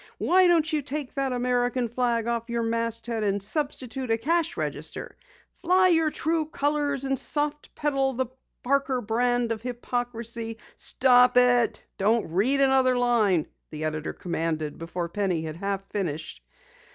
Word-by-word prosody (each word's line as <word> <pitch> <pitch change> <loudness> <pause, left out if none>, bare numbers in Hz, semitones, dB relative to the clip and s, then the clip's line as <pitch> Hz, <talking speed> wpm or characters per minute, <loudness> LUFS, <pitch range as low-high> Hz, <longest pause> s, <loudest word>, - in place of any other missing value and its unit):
WHY 370 +1 +4
DON'T 325 -2 +3
YOU 300 - +1
TAKE 285 0 -5
THAT 275 -1 -1
AMERICAN 245 0 0
FLAG 235 -1 0
OFF 235 0 -2
YOUR 235 0 -1
MASTHEAD 230 0 -1
AND 200 -1 0
SUBSTITUTE 260 0 -2
A 225 - +2
CASH 330 +7 0
REGISTER? - - -4 0.4
FLY 370 +1 +3
YOUR 325 -2 +3
TRUE 320 0 -1
COLORS 290 -2 0
AND 270 -1 0
SOFT 295 0 -1
PEDAL 275 -2 0
THE 260 +1 0 0.4
PARKER 270 -1 +1
BRAND 240 +2 +1
OF 220 -2 -3
HYPOCRISY!" 235 -2 -4 0.2
"Stop 250 -1 +4
it 245 -1 +3 0.2
don't 210 -2 +1
read 250 +11 +2
another 265 -2 +4
line!" 220 -9 +2 0.2
the 155 0 -6
editor 155 0 -3
commanded 160 -3 -3
before 170 +1 -4
Penny 180 -2 -1
had 155 0 -6
half 195 +1 -3
finished. 160 -6 -4
245 Hz, 145 wpm, -26 LUFS, 220-275 Hz, 0.4 s, WHY